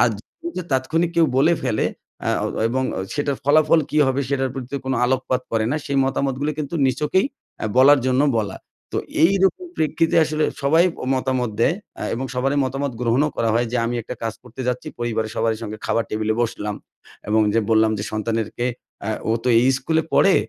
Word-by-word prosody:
আর -, -, +5 dB, 0.3 s
যদি 335 Hz, -, -4 dB
তাৎক্ষণিক 160 Hz, +6 st, +1 dB
কেউ 165 Hz, -1 st, +5 dB
বলে 155 Hz, +6 st, +5 dB
ফেলে 115 Hz, -4 st, +1 dB, 0.4 s
অ্যা -, -, 0 dB
অ -, -, +1 dB, 0.2 s
এবং 130 Hz, +2 st, 0 dB, 0.3 s
সেটার 145 Hz, -2 st, -1 dB
ফলাফল 155 Hz, +2 st, +5 dB
কী 150 Hz, -, +1 dB
হবে? 135 Hz, +1 st, +1 dB
সেটার 135 Hz, -2 st, 0 dB
প্রতি 130 Hz, +1 st, -6 dB
কোনো 130 Hz, -2 st, 0 dB
আলোকপাত 130 Hz, 0 st, 0 dB
করে 110 Hz, -1 st, +1 dB
না, 150 Hz, -, 0 dB
সেই 140 Hz, -1 st, 0 dB
মতামতগুলো 135 Hz, +2 st, -1 dB
কিন্তু 150 Hz, +2 st, -4 dB
নিছকেই 150 Hz, -, +1 dB, 0.4 s
এ -, -, +1 dB
বলার 140 Hz, +2 st, +7 dB
জন্য 130 Hz, +1 st, +2 dB, 0.2 s
বলা। 105 Hz, -2 st, -2 dB, 0.4 s
তো -, -, 0 dB, 0.3 s
এইরকম 195 Hz, -, +3 dB
প্রেক্ষিতে 160 Hz, +2 st, +1 dB
আসলে 155 Hz, 0 st, 0 dB, 0.2 s
সবাই 160 Hz, +5 st, +4 dB, 0.2 s
অ -, -, -6 dB
মতামত 130 Hz, -2 st, 0 dB
দেয়, 145 Hz, +8 st, +4 dB, 0.2 s
অ্যা -, -, -5 dB
এবং 130 Hz, +3 st, -3 dB
সবারই 135 Hz, +3 st, +1 dB
মতামত 135 Hz, 0 st, -2 dB
গ্রহণও 125 Hz, +5 st, +2 dB
করা 115 Hz, -, +1 dB
হয় 120 Hz, +1 st, +2 dB
যে, -, -, +1 dB
আমি 120 Hz, -, -2 dB
একটা 125 Hz, -, -6 dB
কাজ 115 Hz, -1 st, -2 dB
করতে 125 Hz, +2 st, -11 dB
যাচ্ছি 125 Hz, 0 st, -2 dB
পরিবারের 110 Hz, -2 st, -2 dB
সবারই 115 Hz, -1 st, +1 dB
সঙ্গে 110 Hz, -1 st, -6 dB
খাবার 115 Hz, -, +1 dB
টেবিলে 110 Hz, 0 st, 0 dB
বসলাম 105 Hz, -2 st, -3 dB, 0.5 s
এবং 110 Hz, +1 st, +3 dB
যে 115 Hz, -, +4 dB
বললাম 110 Hz, 0 st, +4 dB
যে -, -, -3 dB
সন্তানেরকে 110 Hz, +2 st, -2 dB, 0.4 s
"অ্যা 105 Hz, -, -2 dB, 0.2 s
ও -, -, +3 dB
তো 125 Hz, -, +1 dB
এই 130 Hz, -, +3 dB
স্কুলে 160 Hz, +4 st, +1 dB
পড়ে, 195 Hz, -, +5 dB
130 Hz, 190 wpm, -22 LUFS, 115-145 Hz, 0.5 s, বলার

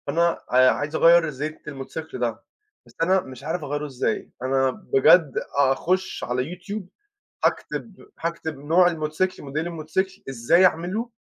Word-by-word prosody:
أنا 170 Hz, 0 st, +2 dB
آآ 130 Hz, 0 st, +6 dB
عايِز 145 Hz, +3 st, -3 dB
أغيِّر 170 Hz, 0 st, +6 dB
زيت 150 Hz, +3 st, -6 dB
الموتوسيكل 150 Hz, +3 st, -7 dB
ده، 120 Hz, -2 st, -2 dB, 0.4 s
بس -, -, -20 dB
أنا 185 Hz, +2 st, +3 dB
مش 130 Hz, -3 st, -11 dB
عارِف 160 Hz, +2 st, -3 dB
أغيِّره 145 Hz, +1 st, -3 dB
إزاي. 130 Hz, -5 st, -2 dB
أنا 130 Hz, 0 st, +2 dB
بجد، 150 Hz, +3 st, +4 dB, 0.2 s
أخُش 170 Hz, +7 st, +1 dB
على 125 Hz, +1 st, -1 dB
YouTube، 200 Hz, +3 st, -6 dB, 0.6 s
هاكتب 220 Hz, -, -1 dB, 0.3 s
هاكتب 160 Hz, -3 st, -4 dB
نوع 165 Hz, +6 st, +4 dB
الموتوسيكل، 165 Hz, +3 st, -2 dB
model 140 Hz, +1 st, -4 dB
الموتسيكل، 175 Hz, +3 st, -3 dB
إزاي 135 Hz, +9 st, +4 dB
أعمله، 185 Hz, +8 st, -1 dB
155 Hz, 140 wpm, -24 LUFS, 135-175 Hz, 0.6 s, آآ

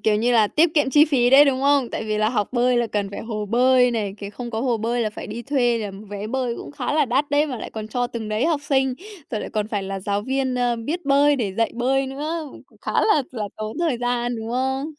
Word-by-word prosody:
kiểu 215 Hz, -1 st, +2 dB
như 235 Hz, +3 st, +1 dB
là 220 Hz, -3 st, +5 dB
tiết 320 Hz, +7 st, +2 dB
kiệm 290 Hz, -3 st, +2 dB
chi 295 Hz, +2 st, +6 dB
phí 255 Hz, -6 st, +2 dB
đấy, 280 Hz, +2 st, +8 dB
đúng 265 Hz, -2 st, +1 dB
không? 280 Hz, -3 st, +3 dB
Tại -, -, -4 dB
vì 215 Hz, -1 st, -1 dB
là 215 Hz, 0 st, +2 dB
học 210 Hz, -4 st, -1 dB
bơi 245 Hz, 0 st, +2 dB
là 240 Hz, -1 st, +2 dB
cần 205 Hz, -2 st, -2 dB
phải 200 Hz, -, -6 dB
hồ 215 Hz, -2 st, -4 dB
bơi 250 Hz, +2 st, +4 dB
này, 210 Hz, -4 st, -2 dB
kiểu, 200 Hz, 0 st, -7 dB
không 240 Hz, +2 st, -7 dB
có 220 Hz, -1 st, -3 dB
hồ 245 Hz, -2 st, +1 dB
bơi 230 Hz, +2 st, -1 dB
là 220 Hz, -2 st, 0 dB
phải -, -, -8 dB
đi 230 Hz, +3 st, -6 dB
thuê, 245 Hz, -4 st, +1 dB
là 210 Hz, -2 st, -4 dB, 0.2 s
vé 205 Hz, 0 st, -5 dB
bơi 250 Hz, 0 st, -2 dB
cũng -, -, -8 dB
khá 290 Hz, -, -3 dB
là 300 Hz, -1 st, +3 dB
đắt 275 Hz, +3 st, 0 dB
đấy, 295 Hz, +1 st, +3 dB
mà 255 Hz, -5 st, -5 dB
lại -, -, -7 dB
còn 215 Hz, -1 st, -6 dB
cho 245 Hz, +2 st, -1 dB
từng 235 Hz, -3 st, -6 dB
đấy 215 Hz, +7 st, 0 dB
học 315 Hz, -4 st, +1 dB
sinh. 265 Hz, -2 st, +1 dB, 0.4 s
Rồi 215 Hz, -, -2 dB
lại -, -, -6 dB
còn 215 Hz, -1 st, -2 dB
phải 205 Hz, -3 st, -2 dB
là 195 Hz, 0 st, -4 dB
giáo 200 Hz, +1 st, -1 dB
viên, 265 Hz, +1 st, -1 dB
ờ, 245 Hz, -1 st, +1 dB
biết 295 Hz, +10 st, -4 dB
bơi 280 Hz, +1 st, +4 dB
để 205 Hz, -6 st, -2 dB
dạy 230 Hz, +2 st, +1 dB
bơi 265 Hz, +3 st, +1 dB
nữa, 300 Hz, +3 st, -4 dB, 0.2 s
cũng -, -, -24 dB
khá -, -, -4 dB
là 315 Hz, -10 st, +3 dB
là 215 Hz, -5 st, -4 dB
tốn 215 Hz, +6 st, -5 dB
thời 320 Hz, -8 st, 0 dB
gian, 245 Hz, 0 st, -1 dB
đúng 225 Hz, 0 st, -6 dB
không? 265 Hz, +2 st, -1 dB
245 Hz, 275 wpm, -22 LUFS, 220-270 Hz, 0.4 s, đấy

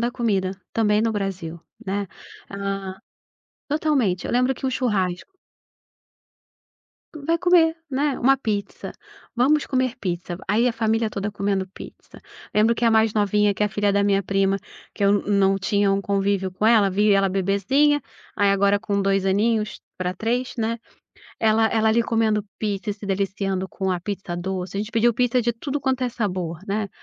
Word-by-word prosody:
da 240 Hz, +1 st, 0 dB
comida, 200 Hz, -6 st, 0 dB, 0.2 s
também 210 Hz, -2 st, +2 dB
no 225 Hz, 0 st, +1 dB
Brasil, 185 Hz, -5 st, -4 dB, 0.3 s
né, 200 Hz, +1 st, -1 dB, 0.5 s
hã 195 Hz, -1 st, -4 dB, 0.7 s
totalmente, 285 Hz, -, 0 dB
eu -, -, -3 dB
lembro 250 Hz, +2 st, +2 dB
que 260 Hz, -, -11 dB
um 265 Hz, -, +1 dB
churrasco 210 Hz, -, -1 dB, 1.8 s
Vai 315 Hz, +2 st, -1 dB
comer, 340 Hz, -2 st, +4 dB
né, 280 Hz, +1 st, 0 dB
uma 270 Hz, +2 st, +4 dB
pizza. 205 Hz, -5 st, -4 dB, 0.4 s
"Vamos 285 Hz, +5 st, +3 dB
comer 255 Hz, -2 st, 0 dB
pizza". 175 Hz, -2 st, -3 dB
Aí 225 Hz, +4 st, +3 dB
a 245 Hz, -, +2 dB
família 225 Hz, 0 st, 0 dB
toda 210 Hz, 0 st, -4 dB
comendo 200 Hz, -1 st, -1 dB
pizza. -, -, -13 dB, 0.3 s
Lembro 220 Hz, +2 st, +3 dB
que 235 Hz, -, -2 dB
a 230 Hz, -, +5 dB
mais 220 Hz, -1 st, +3 dB
novinha, 210 Hz, -1 st, +2 dB
que 210 Hz, -, -2 dB
é -, -, +4 dB
a -, -, -3 dB
filha 205 Hz, 0 st, 0 dB
da 200 Hz, 0 st, +2 dB
minha 200 Hz, -1 st, +2 dB
prima, 195 Hz, +1 st, +1 dB, 0.4 s
que 200 Hz, -, -2 dB
eu 200 Hz, 0 st, +3 dB
não 195 Hz, -1 st, +2 dB
tinha 200 Hz, +1 st, +1 dB
um 195 Hz, -, +1 dB
convívio 200 Hz, -1 st, 0 dB
com 185 Hz, +4 st, -1 dB
ela, 220 Hz, -4 st, +5 dB
vi 205 Hz, +2 st, +3 dB
ela 195 Hz, 0 st, +3 dB
bebezinha, 200 Hz, +10 st, +2 dB, 0.3 s
aí 205 Hz, -1 st, +3 dB
agora 200 Hz, +1 st, +3 dB
com 200 Hz, -1 st, -1 dB
2 195 Hz, 0 st, +1 dB
aninhos, 210 Hz, +2 st, +1 dB, 0.2 s
pra 180 Hz, 0 st, -2 dB
3, 240 Hz, +6 st, -2 dB
né. 230 Hz, +1 st, 0 dB, 0.6 s
Ela 220 Hz, 0 st, +3 dB
ela 220 Hz, 0 st, +2 dB
ali 235 Hz, +2 st, +3 dB
comendo 225 Hz, -2 st, +1 dB, 0.2 s
pizza 210 Hz, -1 st, -3 dB
e 205 Hz, -, 0 dB
se 205 Hz, -, -11 dB
deliciando 195 Hz, -1 st, -2 dB
com 190 Hz, 0 st, -3 dB
a 180 Hz, -1 st, -1 dB
pizza 190 Hz, -2 st, -5 dB
doce. 185 Hz, +1 st, -4 dB
A -, -, 0 dB
gente 215 Hz, +2 st, -5 dB
pediu 230 Hz, +1 st, +3 dB
pizza 245 Hz, +1 st, +1 dB
de 235 Hz, +1 st, +1 dB
tudo 275 Hz, +5 st, -4 dB
quanto 265 Hz, -2 st, -1 dB
é 250 Hz, -, +1 dB
sabor, 185 Hz, -8 st, -3 dB
né. 200 Hz, +1 st, -2 dB
205 Hz, 180 wpm, -23 LUFS, 195-235 Hz, 1.8 s, a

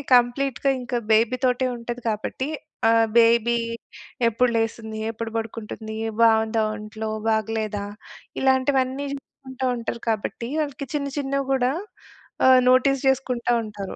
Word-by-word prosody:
కంప్లీట్‌గా 250 Hz, +2 st, +2 dB
ఇంకా 245 Hz, 0 st, -2 dB
బేబీతోటే 250 Hz, +3 st, +2 dB
ఉంటది 240 Hz, +1 st, -6 dB
కాబట్టి 220 Hz, +5 st, -3 dB, 0.4 s
ఆ -, -, +6 dB, 0.3 s
బేబీ 235 Hz, +1 st, +4 dB, 0.7 s
ఎప్పుడు 245 Hz, +2 st, +2 dB
లేస్తుంది? 220 Hz, -1 st, -2 dB
ఎప్పుడు 225 Hz, 0 st, -5 dB
పడుకుంటుంది? 220 Hz, 0 st, -6 dB, 0.3 s
బావుందా 220 Hz, 0 st, +3 dB
ఒంట్లో? 215 Hz, +1 st, -6 dB, 0.2 s
బాగలేదా? 220 Hz, -2 st, -1 dB, 0.6 s
ఇలాంటివన్నీ, 265 Hz, +1 st, +2 dB
చూసుకుంటూ 265 Hz, -1 st, -7 dB
ఉంటారు 235 Hz, 0 st, -5 dB
కాబట్టి 225 Hz, +2 st, -2 dB
వాళ్ళకి 280 Hz, -2 st, -4 dB
చిన్న 280 Hz, -1 st, -1 dB
చిన్నవి 275 Hz, -1 st, -1 dB
గూడా 255 Hz, 0 st, +2 dB, 0.8 s
ఆహ్, 260 Hz, -1 st, +8 dB
నోటీస్ 260 Hz, +2 st, +3 dB
జేసుకుంటా 255 Hz, -2 st, +1 dB
ఉంటారు. 205 Hz, -3 st, -7 dB
240 Hz, 110 wpm, -24 LUFS, 220-260 Hz, 0.8 s, ఆహ్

